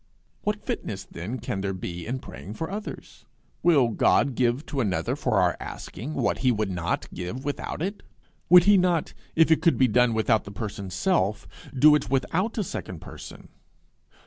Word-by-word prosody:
What 210 0 -2
fitness 95 -2 -4
then 100 +10 -6
can 100 -5 -4
there 95 -1 -2
be 90 -1 -6
in 125 +3 -2
praying 105 -4 -9
for 160 +7 -4
others? 210 +2 -8 0.3
Will 145 -9 +4
God 135 +4 +3
give 125 +4 +1
to 140 -3 -2
another 100 -6 -1
for - - +1
our - - +3
asking 145 +7 -7
what - - 0
he 130 - +3
would 105 -3 -1
not 85 -1 -2
give 95 +10 -5
without 145 +2 -3
it? 200 +3 -3 0.5
Would 175 0 +9
he 200 +1 +6
not, 175 -3 +1 0.2
if 160 0 +5
it 160 - +4
could 165 -1 +3
be 130 - +5
done 125 0 +3
without 110 0 +2
the - - -9
person's 100 -3 -6
self, 105 - +1 0.3
do 150 +4 +7
it 150 - +1
without 175 - 0
a 215 - +1
second 95 - -6
person? - - -11
125 Hz, 180 wpm, -26 LUFS, 100-160 Hz, 0.5 s, Would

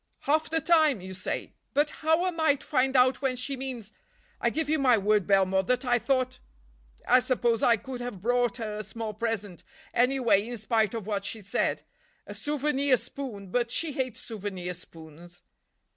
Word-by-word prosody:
"Half 310 +2 +1
the 325 0 +1
time, 310 - +4
you 190 +1 -8
say. 185 - -4 0.2
But 295 +1 +3
how 320 +3 +3
am 355 -3 -2
I 315 -3 +4
to - - -14
find 265 -1 +1
out 255 +1 +4
when 265 -2 0
she 260 +3 -2
means—I 260 - -6
give 320 -1 -1
you 310 +1 +1
my 255 -4 +5
word, 210 -1 +2
Belmore, 190 -1 +3
that 250 +4 0
I 245 -1 +3
thought—I 65 - -1
suppose 240 -3 +1
I 235 -1 +5
could 255 +2 -7
have 245 -6 -5
brought 245 +3 +1
her 215 -3 -4
a - - -4
small 220 +1 -6
present, 210 -5 -3 0.3
anyway, 240 -5 +3
in 240 0 -5
spite 220 -1 +1
of 220 -4 -4
what 200 -2 -2
she 210 +1 -5
said; 200 - -1 0.4
a - - -8
souvenir 285 -2 +1
spoon—but 235 -3 -4
she 320 +6 0
hates 260 -4 -3
souvenir 190 -5 -5
spoons." 170 0 -13
240 Hz, 175 wpm, -28 LUFS, 200-270 Hz, 0.4 s, my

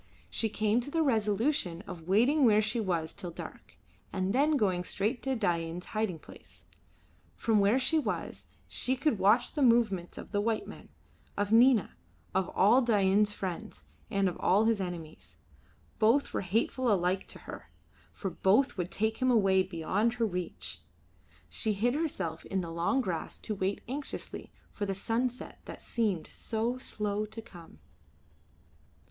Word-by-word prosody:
She 225 - +1
came 215 +2 +1
to 245 - -6
the 325 +2 +1
resolution 215 - +1
of 165 -6 -9
waiting 245 +10 +4
where 215 -4 +6
she 215 +2 0
was 170 -6 -1
till 180 - -5
dark, 165 - -10 0.3
and 190 0 -1
then 290 +3 +3
going 185 -6 +1
straight 215 +7 -1
to 265 -1 -1
Dain's 175 -5 -1
hiding 215 -5 -1
place. - - -14 0.7
From 220 -2 +2
where 200 +5 +4
she 290 +5 +2
was - - -4 0.2
she 260 - +1
could 260 -5 0
watch 210 +6 +4
the 295 - -3
movements 230 -8 +2
of - - -9
white 215 +2 0
men, - - -11 0.5
of 205 +1 -1
Nina, 235 -1 +5 0.4
of 190 -1 0
all 235 +7 +5
Dain's 210 -3 +3
friends, 200 +2 -6 0.2
and 195 -1 +1
of 180 - -3
all 200 +4 +4
his 225 -3 +2
enemies. 170 -4 -7 0.6
Both 235 +6 +3
were - - 0
hateful 225 +5 0
alike 185 -1 +1
to - - -9
her, - - -10 0.4
for 195 - -5
both 205 +9 +2
would 180 -1 -2
take 220 +2 0
him 255 0 +1
away 195 -5 +4
beyond 190 +6 0
her 235 -2 +1
reach. 180 -4 -4 0.7
She 220 - -1
hid 235 +5 +1
herself 195 - -2
in 190 -1 -1
the 170 -2 -6
long 170 +11 +1
grass 175 -8 -3
to 215 - -4
wait 195 0 -2
anxiously 275 +3 -5 0.2
for 205 - -4
the 195 - -2
sunset 240 +5 -2
that - - -8
seemed 210 -8 -1
so 230 +3 -3
slow 210 -3 -2
to 225 +2 -8
come. 175 -7 -14
210 Hz, 160 wpm, -30 LUFS, 185-235 Hz, 0.7 s, where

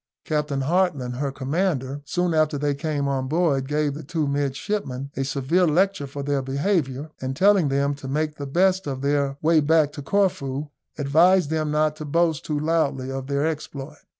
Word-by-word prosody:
Captain 150 -3 -1
Hartland, 145 -6 0
her 140 0 -1
commander, 140 -1 -1
soon 175 +3 0
after 155 -2 +2
they 145 0 0
came 145 0 -2
on 135 -1 -1
board, 145 -4 +1
gave 150 0 0
the 150 - -7
two 155 0 -2
midshipmen 140 0 -2
a 135 - -1
severe 140 +7 +1
lecture 180 -1 +1
for 140 +1 -6
their 140 -1 0
behaviour, 140 0 -1
and 130 0 -3
telling 195 -1 +4
them 140 +1 +1
to 140 -1 -8
make 150 +2 -1
the 140 - -5
best 185 +5 +2
of 135 -1 -4
their 140 -1 +1
way 160 0 +5
back 155 0 +3
to 145 - -8
Corfu, 145 -5 0 0.3
advised 160 +4 +4
them 155 -1 0
not 150 0 +1
to 155 - -6
boast 160 -1 +1
too 150 -1 -2
loudly 145 -4 0
of 135 0 -5
their 140 +1 0
exploit. 150 -2 -5
145 Hz, 180 wpm, -24 LUFS, 140-160 Hz, 0.3 s, way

